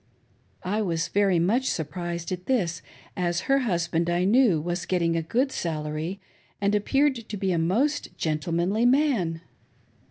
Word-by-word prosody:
I 205 +4 -1
was 170 -4 -1
very 195 -3 +2
much 225 +10 +2
surprised 170 +2 -4
at 180 0 -5
this, 195 -11 0 0.3
as 175 0 0
her 275 +6 +2
husband, 170 -7 0
I 175 +1 +1
knew, 215 -5 +4
was 175 +3 -3
getting 170 -2 +1
a 165 - +1
good 250 - 0
salary, 155 +1 -3 0.4
and 200 0 +1
appeared 270 +7 +2
to 210 - -4
be 190 -1 0
a 170 - +1
most 250 - +1
gentle 155 +2 -2
manly 195 +8 +2
man. 245 - +2
180 Hz, 155 wpm, -26 LUFS, 170-220 Hz, 0.4 s, knew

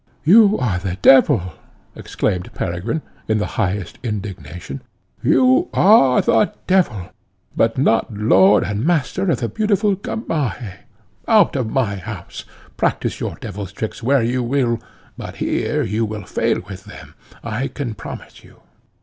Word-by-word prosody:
"You 210 +5 +6
are 100 -8 -1
the 90 -1 -4
devil!" 95 -10 +5 0.4
exclaimed 90 -3 -3
Peregrine, 95 - -3 0.2
in 110 - +1
the 105 - -1 0.2
highest 95 -2 -3
indignation, 95 - -6 0.4
"you 130 0 +3
are 135 - +5
the 210 - +2
devil! 170 - +1 0.4
but 115 +2 +1
not 120 -4 +2
lord 100 -1 +4
and 105 +2 -3
master 175 +4 0
of 165 - 0
the 115 - 0
beautiful 205 - +1
Gamaheh. 140 - -4 0.4
Out 220 -8 +4
of 125 -5 -1
my 110 -5 -1
house! 95 - -8 0.3
Practise - - -1
your - - -4
devil's 100 -2 -7
tricks 110 +2 -5
where 130 +1 +2
you 125 +2 0
will, 120 -2 0 0.4
but - - -7
here - - -1
you 105 +4 -1
will 105 -2 -5
fail - - 0
with - - -9
them, - - -12 0.3
I 115 +4 -2
can 130 -6 -5
promise - - -10
you." - - -19
115 Hz, 140 wpm, -19 LUFS, 100-140 Hz, 0.4 s, You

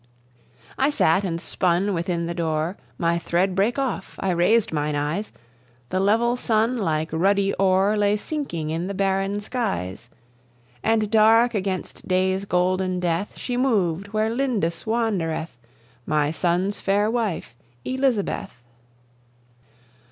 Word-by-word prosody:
I 270 +2 +4
sat 195 - +2
and 170 -3 -2
spun 185 +2 0
within 170 -1 -1
the 170 - -3
doore, 165 +1 -1 0.2
My 170 0 +1
thread 180 +3 0
brake 200 +7 +1
off, 265 -8 -3
I 190 - 0
raised 180 +6 +3
myne 150 -1 -1
eyes; 150 +9 -2 0.6
The 185 - +1
level 225 +5 +3
sun, 230 0 +1
like 160 -4 0
ruddy 195 +4 +2
ore, 195 +2 +3
Lay 205 0 +2
sinking 205 - -4
in 165 +3 -2
the 200 - -4
barren 195 +1 0
skies; 190 - -3 0.7
And 220 -2 +1
dark 225 +2 +5
against 190 -3 -3
day's 190 +1 +1
golden 185 0 +1
death 175 +2 -1
She 245 -1 -3
moved 200 -8 +1
where 215 +1 0
Lindis 230 -10 -1
wandereth, 195 - -1 0.5
My 150 -1 +1
sonne's 180 +4 0
faire 205 +2 +2
wife, 220 - -2 0.3
Elizabeth. 260 - -1
195 Hz, 130 wpm, -23 LUFS, 170-220 Hz, 0.7 s, dark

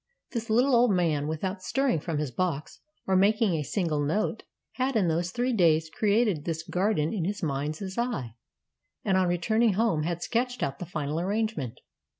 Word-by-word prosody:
This 230 -1 -4
Httle 250 +5 +3
old 240 0 +5
man, 165 -7 +1
without 185 +5 -3
stirring 255 - +1
from 160 0 -3
his 145 -3 -2
box 160 -1 -2 0.3
or 190 - +1
making 205 +1 +3
a 160 - 0
single 155 -2 -1
note, 210 +9 0 0.3
had 260 0 -1
in 200 -5 +3
those 170 +2 0
three 245 +5 -1
days 160 -5 +3
created 210 -6 +2
this 160 -1 -3
garden 180 -2 0
in 195 -6 -1
his 200 +3 -3
mind's 155 +6 -3
eye, 225 - -2 0.7
and 195 - +2
on 185 -1 +3
returning 215 +6 +2
home 205 -6 +1
had 170 +2 -2
sketched 245 +1 -1
out 140 0 -2
the 180 - -6
final 150 -2 -2
arrangement. 195 - -2
185 Hz, 175 wpm, -27 LUFS, 155-220 Hz, 0.7 s, old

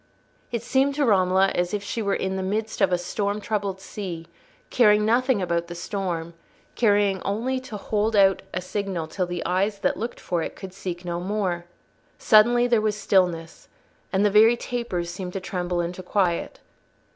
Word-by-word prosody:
It 235 -2 -2
seemed 270 +3 +2
to 290 -1 +2
Romola 190 -3 +4
as 175 +3 -1
if 205 - -4
she 225 +3 -3
were 200 -2 0
in 190 0 -2
the 190 - -2
midst 215 +3 -2
of 195 - +4
a 180 - +3
storm 200 +3 -2
troubled 200 -2 -2
sea, 185 -4 -6 0.5
caring 210 -3 +5
nothing 240 -2 +2
about 170 -1 -1
the 175 - -7
storm, 170 -3 -4 0.4
caring 205 -4 +2
only 240 +6 -1
to 255 -5 -8
hold 215 +2 -1
out 195 -1 +5
a 185 - -3
signal 190 -3 -3
till 180 +3 -3
the 175 -1 -4
eyes 195 +3 0
that - - +1
looked 230 +3 -5
for 175 -2 -2
it - - -5
could 190 -2 -9
seek 180 -2 -5
it - - -16
no 170 -1 -2
more. 185 -2 -2 0.5
Suddenly 240 +3 +5
there 235 -3 +3
was 215 -1 0
stillness, 175 -5 0 0.4
and 195 +1 +2
the 205 - +3
very 220 +3 +6
tapers 210 -9 -3
seemed 180 0 -6
to 195 - -2
tremble 180 -1 -2
into 175 +2 -4
quiet. 180 -2 -1
195 Hz, 185 wpm, -24 LUFS, 180-215 Hz, 0.5 s, very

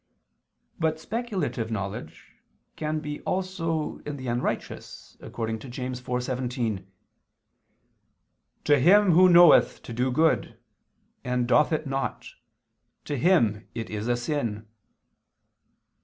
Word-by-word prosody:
But 160 -1 0
speculative 190 - -3
knowledge 100 -3 -6 0.4
can 155 0 -2
be 150 -1 -6
also 170 -4 -2
in 145 -1 -6
the 130 - -8
unrighteous, 120 +1 -4
according 110 -1 -4
to 125 - -10
James 125 0 -5
4:17: 125 -5 -3 1.8
"To 145 -1 +4
him... 190 +7 +5
who 180 +3 +6
knoweth 175 -1 +6
to 115 - -8
do 125 +3 0
good, 155 -5 +1 0.7
and 125 -1 -1
doth 150 +5 +4
it 155 -1 -1
not, 135 0 -3 0.8
to 145 - -3
him 120 - +2
it 115 -1 -5
is 105 +1 -4
a 120 0 +1
sin." 120 -5 -3
130 Hz, 110 wpm, -26 LUFS, 120-160 Hz, 1.8 s, who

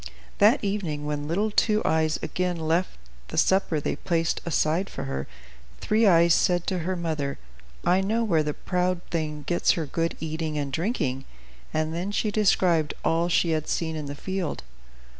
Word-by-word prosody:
That - - +5
evening, 180 -8 -2
when 145 0 -3
little 205 +7 0
Two 215 +1 +2
Eyes 160 0 +2
again 180 -1 -1
left 165 - 0 0.3
the - - -7
supper 190 -5 +3
they - - -2
placed 165 -1 0
aside 165 +3 +1
for - - -6
her, 65 0 -4 0.5
Three 220 +1 +2
Eyes 170 -2 +6
said 175 -1 +2
to 185 -2 -1
her 185 +3 -2
mother, 155 -5 -2 0.5
"I 180 +2 +4
know 220 +4 0
where 170 -8 +2
the 150 -1 -2
proud 180 -1 -1
thing 150 -3 -2
gets 175 +4 +2
her 165 - -2
good 165 +3 -2
eating 160 -1 -3
and 140 -2 -3
drinking;" 140 - -1 0.5
and 155 0 -1
then 180 +4 -3
she 210 +1 0
described 180 -7 +2
all 165 +1 +2
she 170 -1 +2
had 155 -1 -1
seen 160 -1 -1
in 150 -2 -5
the 140 - -5
field. 180 - -3
165 Hz, 175 wpm, -26 LUFS, 155-185 Hz, 0.5 s, Eyes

